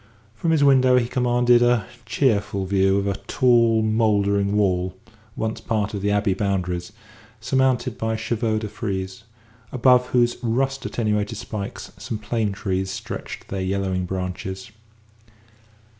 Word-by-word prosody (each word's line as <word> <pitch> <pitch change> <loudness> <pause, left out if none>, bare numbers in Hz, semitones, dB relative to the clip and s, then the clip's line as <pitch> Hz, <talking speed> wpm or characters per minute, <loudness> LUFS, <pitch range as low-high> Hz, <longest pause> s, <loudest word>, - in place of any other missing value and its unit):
From 165 +9 -2
his 160 -3 +3
window 130 -2 +5
he 120 -2 +1
commanded 120 -1 +3
a 120 -4 +3 0.2
cheerful 105 -5 0
view 95 0 +2
of 100 - 0
a 100 -1 -1
tall, 115 -3 +3
mouldering 105 -2 +2
wall, 95 -2 +1 0.4
once 110 0 -3
part 110 -2 -1
of 100 - -3
the 100 - 0
Abbey 105 -1 +2
boundaries, 90 -2 -2 0.5
surmounted 130 0 0
by 110 0 -1
chevaux 110 0 -1
de 110 0 -3
frise, 95 -1 -5 0.5
above 125 0 +4
whose 120 -1 +2
rust 135 +3 -1
attenuated 105 -1 -1
spikes 100 -1 -6
some 110 - -4
plane 110 -1 -1
trees 95 -1 -2
stretched 95 - -7
their 95 -1 -3
yellowing 95 -1 -1
branches. 95 +4 -5
110 Hz, 135 wpm, -23 LUFS, 100-120 Hz, 0.5 s, window